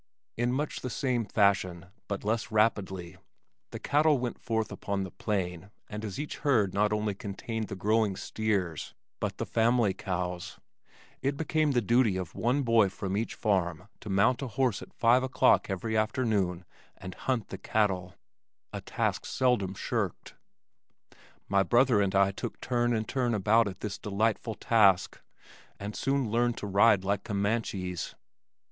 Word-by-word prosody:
In 120 Hz, +1 st, 0 dB
much 145 Hz, +4 st, -2 dB
the 125 Hz, -, -4 dB
same 125 Hz, -2 st, -1 dB
fashion, 95 Hz, -5 st, +1 dB, 0.2 s
but 100 Hz, -1 st, -4 dB
less 110 Hz, +1 st, -1 dB
rapidly, 95 Hz, -5 st, 0 dB, 0.5 s
the -, -, -6 dB
cattle 150 Hz, 0 st, +3 dB
went 120 Hz, -1 st, -4 dB
forth 110 Hz, -2 st, -2 dB
upon 100 Hz, -1 st, -3 dB
the 95 Hz, -, -7 dB
plain 95 Hz, -3 st, -3 dB, 0.2 s
and 105 Hz, +1 st, -6 dB
as 105 Hz, 0 st, -5 dB
each 150 Hz, -, -4 dB
herd 110 Hz, -10 st, +2 dB
not 105 Hz, +1 st, +2 dB
only 105 Hz, -1 st, 0 dB
contained 105 Hz, +3 st, -5 dB
the -, -, -5 dB
growing 105 Hz, +1 st, +1 dB
steers, 95 Hz, -8 st, -2 dB, 0.2 s
but -, -, -3 dB
the -, -, -2 dB
family 115 Hz, -3 st, +2 dB
cows, 90 Hz, -2 st, -4 dB, 0.6 s
it 140 Hz, +1 st, -1 dB
became 155 Hz, -1 st, +1 dB
the 120 Hz, -2 st, +2 dB
duty 115 Hz, -3 st, +3 dB
of 90 Hz, -3 st, -5 dB
one 125 Hz, +5 st, +1 dB
boy 115 Hz, -4 st, +4 dB
from 95 Hz, 0 st, -4 dB
each 110 Hz, +3 st, -2 dB
farm 90 Hz, -3 st, -1 dB
to 105 Hz, -, -9 dB
mount 100 Hz, +7 st, +3 dB
a 135 Hz, -, -3 dB
horse 120 Hz, -2 st, 0 dB
at -, -, -11 dB
five 120 Hz, +2 st, +4 dB
o'clock 130 Hz, -4 st, +3 dB
every 110 Hz, +4 st, -2 dB
afternoon 105 Hz, -6 st, 0 dB, 0.3 s
and 95 Hz, -1 st, -8 dB
"hunt 130 Hz, -4 st, -2 dB
the -, -, -7 dB
cattle," 95 Hz, -4 st, 0 dB, 0.6 s
a -, -, -4 dB
task -, -, -1 dB
seldom 120 Hz, -7 st, 0 dB
shirked. -, -, -3 dB, 1.1 s
My 100 Hz, -1 st, +3 dB
brother 120 Hz, +3 st, +4 dB
and 100 Hz, -1 st, 0 dB
I 100 Hz, 0 st, +4 dB
took 100 Hz, -, -6 dB
turn 120 Hz, -1 st, +1 dB
and 110 Hz, 0 st, -2 dB
turn 125 Hz, -3 st, 0 dB
about 110 Hz, +3 st, +3 dB
at 95 Hz, -, -7 dB
this 105 Hz, -2 st, -4 dB
delightful 110 Hz, +2 st, -1 dB
task, 100 Hz, -6 st, +3 dB, 0.6 s
and 105 Hz, +1 st, -6 dB
soon 135 Hz, -5 st, 0 dB
learned 120 Hz, +1 st, +1 dB
to -, -, -5 dB
ride 100 Hz, 0 st, +4 dB
like 100 Hz, 0 st, -1 dB
Comanches. 100 Hz, -4 st, -2 dB
105 Hz, 160 wpm, -29 LUFS, 95-120 Hz, 1.1 s, boy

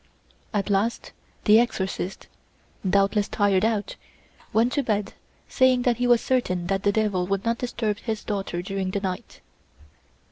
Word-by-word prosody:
At 205 Hz, -1 st, -1 dB
last 205 Hz, +4 st, 0 dB, 0.3 s
the 215 Hz, +1 st, +7 dB
exorcist, 190 Hz, -5 st, -2 dB, 0.6 s
doubtless 200 Hz, +1 st, +2 dB
tired 200 Hz, -2 st, +2 dB
out, 220 Hz, -2 st, -1 dB, 0.5 s
went 235 Hz, +3 st, +2 dB
to 285 Hz, -, +2 dB
bed 210 Hz, -5 st, -1 dB, 0.3 s
saying 255 Hz, -1 st, +3 dB
that 245 Hz, -2 st, +2 dB
he 245 Hz, 0 st, +1 dB
was 240 Hz, -1 st, +5 dB
certain 185 Hz, -9 st, 0 dB
that 195 Hz, +2 st, 0 dB
the 205 Hz, -, +2 dB
devil 200 Hz, -4 st, 0 dB
would 195 Hz, +1 st, -1 dB
not 230 Hz, 0 st, 0 dB
disturb 225 Hz, -4 st, -2 dB
his 220 Hz, -3 st, -4 dB
daughter 195 Hz, -4 st, -3 dB
during 195 Hz, 0 st, -3 dB
the 200 Hz, -, -1 dB
night. 185 Hz, -2 st, -5 dB
205 Hz, 150 wpm, -25 LUFS, 195-230 Hz, 0.6 s, the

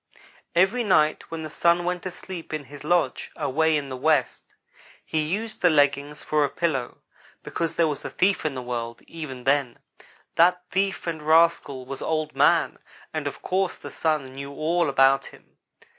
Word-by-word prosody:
"Every 195 Hz, +8 st, +3 dB
night 155 Hz, -7 st, +2 dB
when 165 Hz, -1 st, -5 dB
the 155 Hz, -, -7 dB
Sun 170 Hz, +2 st, +3 dB
went 180 Hz, 0 st, -1 dB
to 185 Hz, -, -4 dB
sleep 175 Hz, -3 st, -7 dB
in 155 Hz, -, -5 dB
his 145 Hz, +2 st, -12 dB
lodge 160 Hz, -4 st, +1 dB
away 160 Hz, +3 st, +1 dB
in 140 Hz, -2 st, -4 dB
the 130 Hz, -, -4 dB
west, 140 Hz, 0 st, 0 dB, 0.5 s
he 155 Hz, -, 0 dB
used 205 Hz, +9 st, -3 dB
the 180 Hz, -, +5 dB
leggings 145 Hz, -1 st, +1 dB
for 150 Hz, -1 st, +2 dB
a 145 Hz, -, +1 dB
pillow, 135 Hz, -8 st, -2 dB, 0.4 s
because 165 Hz, -1 st, -3 dB
there 165 Hz, -, +3 dB
was 150 Hz, -3 st, -3 dB
a -, -, -4 dB
thief 190 Hz, +1 st, +1 dB
in 155 Hz, -3 st, -2 dB
the 130 Hz, -, -5 dB
world, 120 Hz, -1 st, -5 dB
even 140 Hz, -6 st, -8 dB
then. 135 Hz, -2 st, +1 dB, 0.6 s
That 180 Hz, +2 st, +4 dB
thief 195 Hz, -1 st, 0 dB
and 165 Hz, -2 st, -3 dB
rascal 155 Hz, -4 st, +3 dB
was 135 Hz, +1 st, -7 dB
Old 155 Hz, -1 st, -2 dB
man, -, -, +3 dB, 0.3 s
and -, -, -2 dB
of -, -, -7 dB
course 190 Hz, 0 st, 0 dB
the -, -, -9 dB
Sun 150 Hz, -5 st, -1 dB
knew 140 Hz, +1 st, -7 dB
all 160 Hz, +3 st, 0 dB
about 135 Hz, 0 st, +4 dB
him. -, -, -17 dB
155 Hz, 180 wpm, -25 LUFS, 140-170 Hz, 0.6 s, the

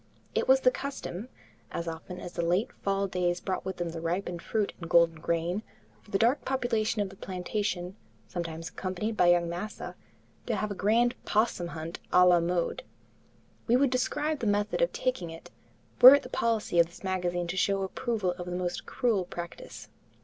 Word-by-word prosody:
It -, -, 0 dB
was 265 Hz, 0 st, +6 dB
the 255 Hz, -, +5 dB
custom, 255 Hz, -6 st, -5 dB, 0.4 s
as 170 Hz, -, -4 dB
often 165 Hz, +3 st, -6 dB
as 175 Hz, -, -8 dB
the -, -, -2 dB
late 175 Hz, +6 st, +1 dB
fall 195 Hz, 0 st, +1 dB
days 180 Hz, -2 st, 0 dB
brought 185 Hz, 0 st, -3 dB
with 190 Hz, 0 st, -4 dB
them 175 Hz, -1 st, -2 dB
the 165 Hz, 0 st, -6 dB
ripened 175 Hz, +1 st, -2 dB
fruit 210 Hz, +3 st, -1 dB
and 165 Hz, -, -6 dB
golden 170 Hz, -2 st, +4 dB
grain, 170 Hz, +5 st, -1 dB, 0.4 s
for -, -, -21 dB
the 195 Hz, -, +1 dB
dark 240 Hz, +7 st, +2 dB
population 230 Hz, -5 st, 0 dB
of 195 Hz, -, -5 dB
the 195 Hz, -, -13 dB
plantation, 185 Hz, 0 st, -3 dB, 0.3 s
sometimes 165 Hz, -2 st, -5 dB
accompanied 195 Hz, +4 st, -3 dB
by 180 Hz, -, +4 dB
young 175 Hz, -1 st, +4 dB
"massa," 175 Hz, +6 st, -5 dB, 0.5 s
to -, -, 0 dB
have 215 Hz, -1 st, -2 dB
a -, -, -1 dB
grand 230 Hz, +5 st, +2 dB
'possum 210 Hz, -5 st, +1 dB
hunt 165 Hz, 0 st, -6 dB
a 180 Hz, 0 st, +7 dB
la 175 Hz, -1 st, +6 dB
mode. 175 Hz, -, -1 dB, 0.9 s
We 240 Hz, -, +4 dB
would 265 Hz, 0 st, +3 dB
describe 295 Hz, +4 st, 0 dB
the 225 Hz, -, -1 dB
method 205 Hz, -, +1 dB
of -, -, +3 dB
taking 250 Hz, -10 st, -2 dB
it, 165 Hz, 0 st, -11 dB, 0.5 s
were 260 Hz, +3 st, +12 dB
it 285 Hz, -, 0 dB
the 250 Hz, -, -9 dB
policy 225 Hz, -8 st, 0 dB
of 170 Hz, -, +6 dB
this 175 Hz, -, -16 dB
magazine 180 Hz, -2 st, -1 dB
to 170 Hz, +2 st, -4 dB
show 195 Hz, +1 st, +1 dB
approval 210 Hz, -1 st, -1 dB
of 175 Hz, -, -5 dB
a -, -, -4 dB
most 180 Hz, 0 st, -3 dB
cruel 225 Hz, -8 st, +1 dB
practice. 175 Hz, -1 st, -8 dB
185 Hz, 190 wpm, -29 LUFS, 175-220 Hz, 0.9 s, were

